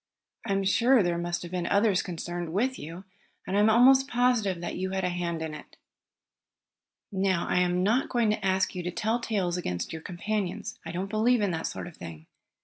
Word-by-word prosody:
I 200 Hz, -, +1 dB
am 195 Hz, 0 st, +1 dB
sure 235 Hz, +4 st, +4 dB
there 175 Hz, -1 st, 0 dB
must 175 Hz, 0 st, -3 dB
have 175 Hz, -, -8 dB
been 180 Hz, -1 st, -2 dB
others 200 Hz, -2 st, +3 dB
concerned 175 Hz, -1 st, -5 dB
with 255 Hz, +7 st, 0 dB
you, 165 Hz, +5 st, -8 dB, 0.4 s
and 190 Hz, -, -2 dB
I -, -, +4 dB
am 210 Hz, +1 st, +5 dB
almost 260 Hz, +4 st, +6 dB
positive 240 Hz, -8 st, +1 dB
that 175 Hz, -, -4 dB
you 190 Hz, +1 st, -2 dB
had 190 Hz, 0 st, -2 dB
a 180 Hz, -, +1 dB
hand 170 Hz, -2 st, -3 dB
in 160 Hz, -1 st, -5 dB
it. 150 Hz, -, -11 dB, 1.3 s
"Now 190 Hz, -3 st, +1 dB
I -, -, +2 dB
am 180 Hz, 0 st, +1 dB
not 230 Hz, +7 st, +2 dB
going 235 Hz, -4 st, +2 dB
to 210 Hz, -1 st, -2 dB
ask 190 Hz, 0 st, +1 dB
you 180 Hz, -, -4 dB
to 175 Hz, -, -3 dB
tell 220 Hz, +6 st, 0 dB
tales 195 Hz, -7 st, -1 dB
against 90 Hz, -, -3 dB
your 160 Hz, -, -6 dB
companions. 185 Hz, +2 st, -3 dB
I 165 Hz, -, -6 dB
don't 180 Hz, +3 st, -3 dB
believe 220 Hz, +4 st, +2 dB
in 200 Hz, -2 st, +1 dB
that 165 Hz, -1 st, -2 dB
sort -, -, -5 dB
of 175 Hz, -, -11 dB
thing. 80 Hz, -2 st, -9 dB
190 Hz, 215 wpm, -28 LUFS, 175-215 Hz, 1.3 s, almost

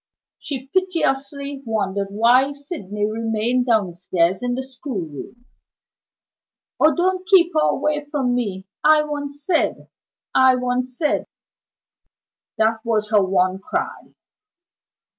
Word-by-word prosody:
She 265 Hz, -3 st, -4 dB
piteously 280 Hz, -5 st, -1 dB
wondered 200 Hz, -4 st, -1 dB
why 240 Hz, +7 st, +3 dB
Sydney 210 Hz, -, -4 dB
remained 225 Hz, +3 st, -1 dB
downstairs 185 Hz, -4 st, +1 dB
in 245 Hz, 0 st, -1 dB
the 260 Hz, -, -3 dB
schoolroom. 240 Hz, -, -7 dB, 1.3 s
"Oh, 310 Hz, +1 st, +5 dB
don't 370 Hz, +1 st, 0 dB
keep 355 Hz, -2 st, +5 dB
her 310 Hz, -, +3 dB
away 300 Hz, -1 st, 0 dB
from 265 Hz, -4 st, 0 dB
me! 200 Hz, -6 st, -2 dB, 0.2 s
I 305 Hz, 0 st, +6 dB
want 290 Hz, -1 st, -4 dB
Syd! 290 Hz, +4 st, -1 dB, 0.4 s
I 260 Hz, 0 st, +5 dB
want 250 Hz, 0 st, -1 dB
Syd!" 275 Hz, +4 st, -1 dB, 1.3 s
That 220 Hz, 0 st, +1 dB
was 215 Hz, -2 st, 0 dB
her 210 Hz, -2 st, +5 dB
one 185 Hz, 0 st, +1 dB
cry. 200 Hz, -, -4 dB
250 Hz, 110 wpm, -21 LUFS, 215-290 Hz, 1.3 s, I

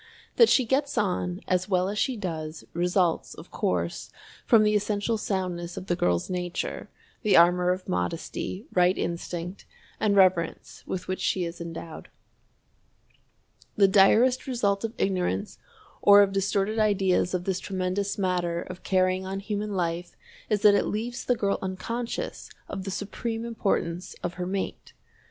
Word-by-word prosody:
That 465 Hz, -, +7 dB
she 260 Hz, -, +4 dB
gets 275 Hz, +4 st, 0 dB
on 180 Hz, -2 st, -1 dB
as 185 Hz, +1 st, 0 dB
well 185 Hz, -1 st, +2 dB
as 205 Hz, +1 st, -2 dB
she 260 Hz, -3 st, 0 dB
does, 160 Hz, -5 st, -5 dB
results, 175 Hz, 0 st, +1 dB
of -, -, -12 dB
course, 85 Hz, -1 st, -2 dB, 0.4 s
from 225 Hz, -3 st, +6 dB
the 210 Hz, 0 st, +3 dB
essential 210 Hz, +2 st, 0 dB
soundness 180 Hz, -5 st, -3 dB
of -, -, -5 dB
the 175 Hz, -, 0 dB
girl's 90 Hz, -, +1 dB
nature, 180 Hz, -1 st, -4 dB, 0.3 s
the 215 Hz, -4 st, +4 dB
armor 180 Hz, +1 st, +5 dB
of 185 Hz, +1 st, -1 dB
modesty, 165 Hz, -, -3 dB
right 180 Hz, +1 st, +3 dB
instinct, 175 Hz, +2 st, -4 dB, 0.3 s
and 205 Hz, -2 st, +2 dB
reverence 185 Hz, -4 st, +2 dB
with 185 Hz, -, -4 dB
which 185 Hz, -, -2 dB
she 180 Hz, -2 st, 0 dB
is 170 Hz, 0 st, -7 dB
endowed. 165 Hz, -1 st, -8 dB, 1.7 s
The 200 Hz, -2 st, +5 dB
direst 220 Hz, +7 st, +4 dB
result 205 Hz, -6 st, 0 dB
of 225 Hz, +1 st, -3 dB
ignorance 195 Hz, +2 st, -1 dB, 0.4 s
or 205 Hz, 0 st, +8 dB
of 195 Hz, -, 0 dB
distorted 200 Hz, +2 st, 0 dB
ideas 190 Hz, -4 st, +2 dB
of 180 Hz, -, -2 dB
this 185 Hz, -1 st, -1 dB
tremendous 190 Hz, +1 st, -2 dB
matter 180 Hz, -3 st, 0 dB
of 185 Hz, 0 st, -9 dB
carrying 185 Hz, 0 st, +1 dB
on 195 Hz, +1 st, -3 dB
human 210 Hz, 0 st, -3 dB
life 175 Hz, -1 st, -2 dB, 0.3 s
is 210 Hz, -2 st, 0 dB
that 210 Hz, -, +8 dB
it 200 Hz, -, +2 dB
leaves 235 Hz, +3 st, -3 dB
the 245 Hz, -, +2 dB
girl 200 Hz, -3 st, 0 dB
unconscious 230 Hz, -, -4 dB, 0.2 s
of 190 Hz, -1 st, -6 dB
the -, -, -3 dB
supreme 225 Hz, +4 st, -4 dB
importance 195 Hz, -6 st, -2 dB
of 175 Hz, -, -2 dB
her 180 Hz, -1 st, -4 dB
mate. 195 Hz, +1 st, -4 dB
190 Hz, 155 wpm, -26 LUFS, 180-210 Hz, 1.7 s, or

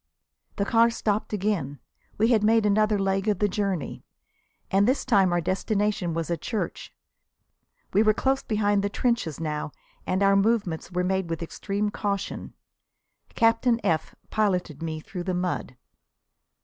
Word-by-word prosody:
The 200 Hz, -, 0 dB
car 230 Hz, +2 st, +4 dB
stopped 215 Hz, -2 st, -1 dB
again. 190 Hz, -10 st, -1 dB, 0.4 s
We 220 Hz, +2 st, +3 dB
had 225 Hz, -4 st, +3 dB
made 220 Hz, 0 st, +4 dB
another 210 Hz, +1 st, +3 dB
leg 195 Hz, +1 st, 0 dB
of 210 Hz, -3 st, +2 dB
the 205 Hz, -, +2 dB
journey. 195 Hz, -5 st, -2 dB, 0.7 s
And 195 Hz, +2 st, +4 dB
this 260 Hz, +3 st, +1 dB
time 195 Hz, -7 st, +4 dB
our 175 Hz, 0 st, +1 dB
destination 195 Hz, -1 st, -1 dB
was 165 Hz, 0 st, -2 dB
a 170 Hz, -, 0 dB
church. 215 Hz, +8 st, -4 dB, 1.0 s
We 200 Hz, -, +5 dB
were 215 Hz, -1 st, +4 dB
close 270 Hz, 0 st, +1 dB
behind 205 Hz, -2 st, +1 dB
the 205 Hz, -, 0 dB
trenches 235 Hz, -, -1 dB
now 155 Hz, -2 st, -3 dB, 0.4 s
and 190 Hz, +2 st, +1 dB
our 195 Hz, 0 st, +5 dB
movements 195 Hz, -5 st, +1 dB
were 180 Hz, 0 st, 0 dB
made 190 Hz, -1 st, 0 dB
with 165 Hz, 0 st, -3 dB
extreme 205 Hz, +5 st, -2 dB
caution. 200 Hz, -1 st, -3 dB, 0.8 s
Captain 230 Hz, +1 st, +3 dB
F 160 Hz, -1 st, 0 dB, 0.2 s
piloted 180 Hz, -8 st, 0 dB
me 160 Hz, -1 st, -4 dB
through 180 Hz, +3 st, -7 dB
the 185 Hz, -1 st, -1 dB
mud. 180 Hz, -8 st, -3 dB
200 Hz, 150 wpm, -26 LUFS, 180-215 Hz, 1.0 s, We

